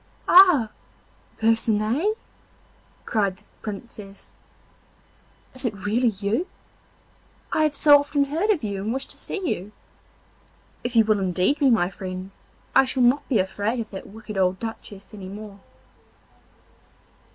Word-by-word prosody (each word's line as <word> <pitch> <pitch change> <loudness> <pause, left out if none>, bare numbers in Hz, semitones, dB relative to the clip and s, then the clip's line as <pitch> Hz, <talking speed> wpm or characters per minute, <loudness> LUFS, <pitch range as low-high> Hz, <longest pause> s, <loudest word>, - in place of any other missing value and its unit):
'Ah, 350 - +7 0.7
Percinet!' 225 - +1 0.9
cried 200 -4 0
the - - -24 0.2
Princess, 205 -2 -9 1.2
'is 260 - -6
it 230 -5 -1
really 235 +4 +2
you? 215 - -1 1.1
I - - +2
have 300 -1 -1
so 290 0 +7
often 285 0 0
heard 320 +9 -1
of 380 - +2
you 200 -2 -3
and 215 +3 -2
wished 265 +2 -4
to - - -8
see 385 -4 -4
you. 195 - -3 1.1
If 245 0 -4
you 225 -1 +6
will 215 -1 +2
indeed 190 - +1
be 280 -3 +4
my 195 -6 +2
friend, 185 0 -7 0.4
I - - +6
shall 260 -1 0
not 255 +4 +2
be 250 - +3
afraid 205 +5 -1
of 225 - -5
that 190 - -8
wicked 215 -1 -7
old 185 0 +1
Duchess 215 -3 -8
any 195 -3 -8
more. 205 0 -9
220 Hz, 140 wpm, -24 LUFS, 200-270 Hz, 1.2 s, Ah